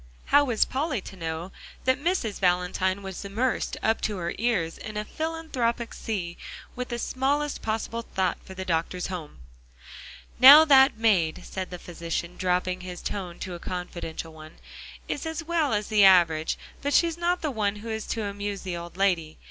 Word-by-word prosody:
How 285 +1 +5
was 240 -6 +2
Polly 270 -2 -1
to 190 - -10
know 165 +1 -5 0.3
that 260 +2 +1
Mrs. 335 - 0
Valentine 185 +1 +1
was 190 0 -6
immersed 225 +6 -1
up 225 0 +2
to 210 -2 -1
her 170 -1 -3
ears 200 -9 0
in 215 -1 -7
a 210 - -2
philanthropic 275 -7 -2
sea 180 -6 -4 0.4
with 250 0 -4
the 240 - -3
smallest 280 +4 -1
possible 225 +1 -2
thought 190 -5 -1
for 190 - -11
the 190 0 -5
doctor's 175 +1 -1
home? 165 -5 -7 1.0
"Now 285 +5 +11
that 270 -5 +6
maid," 195 -8 +2
said 185 -1 -5
the 180 - -6
physician, 170 0 -5
dropping 180 0 0
his 180 -1 -7
tone 180 -4 -4
to 185 - -5
a 175 - -7
confidential 170 -2 -6
one, 155 0 -12 0.5
"is 290 - -3
as 320 0 -4
well 325 -3 0
as 210 -1 -1
the 210 -2 +5
average, 170 -4 +5 0.2
but 285 +1 0
she's 335 -1 +3
not 345 +1 0
the 305 - 0
one 210 -4 0
who 215 +2 -8
is 220 -1 -4
to 225 - -2
amuse 200 0 -4
the 185 -2 -3
old 170 +1 -8
lady. 175 -5 +1
200 Hz, 180 wpm, -26 LUFS, 180-255 Hz, 1.0 s, Now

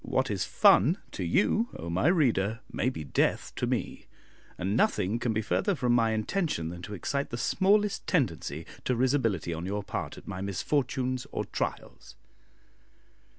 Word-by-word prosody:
What - - 0
is - - -1
fun 145 - +5
to 95 - -4
you, 105 - +2
O 85 - -7
my 90 - +1
reader! 115 - +2
may 125 - 0
be 105 -12 -6
death 70 - 0
to - - -1
me; - - -3 0.5
and 95 +3 -1
nothing 105 0 +2
can 120 - 0
be 110 0 -1
further 200 - +1
from 125 -4 +1
my 115 -2 +3
intention 110 - -1
than 85 +1 -8
to 105 +4 -6
excite 140 +9 -2
the 120 - -4
smallest 200 - +2
tendency 85 - -1 0.2
to 125 - +1
risibility 115 - +1
on 85 +3 -4
your 100 +1 -2
part - - -5
at - - -13
my 95 -2 -5
misfortunes 130 +5 -1
or - - -2
trials. - - -5
115 Hz, 165 wpm, -29 LUFS, 95-140 Hz, 0.5 s, fun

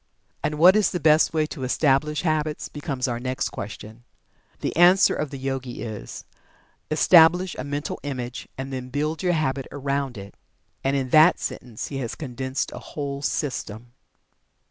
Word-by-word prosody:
And 150 - -1
what 180 +5 +7
is 215 -2 +3
the 180 - -3
best 155 0 +4
way 155 -2 +1
to 150 -3 -7
establish 145 +3 +1
Habits? 155 -2 -1
becomes 140 -3 -3
our 120 -1 -2
next 130 +2 -2
question. 110 +1 -8 0.6
The - - -2
answer 180 +3 +6
of 150 - -3
the 140 - -7
Yogi 135 -2 -4
is: 110 -3 -7 0.6
"Establish 170 +3 +5
a - - -3
Mental 145 +1 -4
Image, 130 -3 -5
and 135 +1 -5
then 130 -1 -5
build 150 +4 -2
your 180 -2 +1
Habit 135 -4 -1
around 140 -2 -2
it." 100 0 -9 0.5
And 135 +1 +1
in 130 -2 -2
that 155 +3 +6
sentence 120 -4 -5
he 140 - -5
has 120 -4 -4
condensed 130 -2 -4
a - - -7
whole 140 -2 -5
system. 120 -6 -3
140 Hz, 165 wpm, -24 LUFS, 130-155 Hz, 0.6 s, what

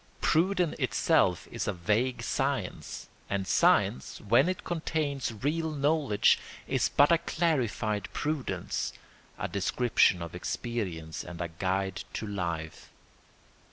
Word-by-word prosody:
Prudence 180 0 +2
itself - - +2
is - - -3
a 105 - 0
vague 110 +7 0
science, - - -2 0.2
and 100 -1 -1
science, 65 - +2
when 150 +7 +4
it 185 - -3
contains 155 -6 -2
real 160 +3 0
knowledge, 145 -6 +3 0.3
is - - +1
but 145 +3 +5
a 170 - +5
clarified 120 - -1
prudence, 150 -3 -2 0.4
a - - -2
description 100 -3 +2
of 85 - -8
experience 90 -4 -4
and 85 -1 -9
a 85 -1 -2
guide 95 +3 -2
to - - -3
life. 85 -6 -4
115 Hz, 120 wpm, -29 LUFS, 95-150 Hz, 0.4 s, but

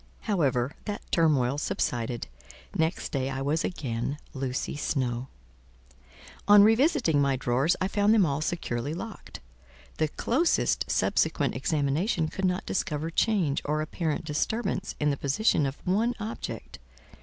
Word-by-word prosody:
However, 140 - +1
that 205 -1 -4
turmoil 145 -5 +2
subsided: 120 -4 -2 0.5
next 160 +2 -1
day 135 -1 -1
I 135 0 -3
was 150 +3 0
again 135 -4 -3 0.2
Lucy 135 0 -3
Snowe. 130 -4 -1 1.2
On 205 0 +9
revisiting 225 - +4
my 140 -1 +2
drawers, 130 +6 +1
I 190 - +1
found 205 +1 +2
them 215 -4 +5
all 145 -1 -1
securely 150 -4 -2
locked; 220 +4 -8 0.6
the 155 - +3
closest 260 - +1
subsequent - - +1
examination 155 - 0
could 190 - -2
not 180 +2 0
discover 160 -3 -2
change 170 -7 +1
or 150 +1 -1
apparent 155 0 -2
disturbance 195 +6 -2
in 150 0 +2
the 140 - -2
position 145 +1 +2
of 135 - -5
one 220 +6 +1
object. 220 +2 -6
155 Hz, 130 wpm, -27 LUFS, 140-195 Hz, 1.2 s, On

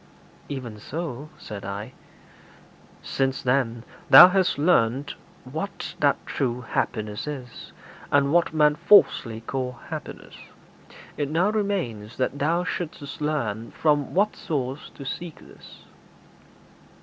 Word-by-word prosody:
'Even 120 -6 -6
so,' 150 +1 -6
said 100 -2 -8
I. 100 +5 -6 1.1
'Since, 135 -1 -1
then, 125 -3 0 0.3
thou 180 - +11
hast 190 -4 +1
learnt 145 -3 +2 0.3
what 160 +10 -5
that 145 -1 +3
true 125 -3 -2
happiness 110 -1 -3
is, 130 -5 -7 0.4
and 140 0 +3
what 175 0 +3
men 150 -1 +4
falsely 150 - +4
call 125 +2 -3 0.2
happiness, - - -7 0.8
it 145 -1 -1
now 175 +7 +2
remains 175 - -2
that 130 +2 -1
thou 165 +5 +1
shouldst 155 -4 -5
learn 115 -8 -2
from 150 -2 0
what 205 +3 +2
source 135 -2 -4
to 140 - -9
seek 165 +4 -6
this.' - - -15
140 Hz, 115 wpm, -25 LUFS, 120-160 Hz, 1.1 s, thou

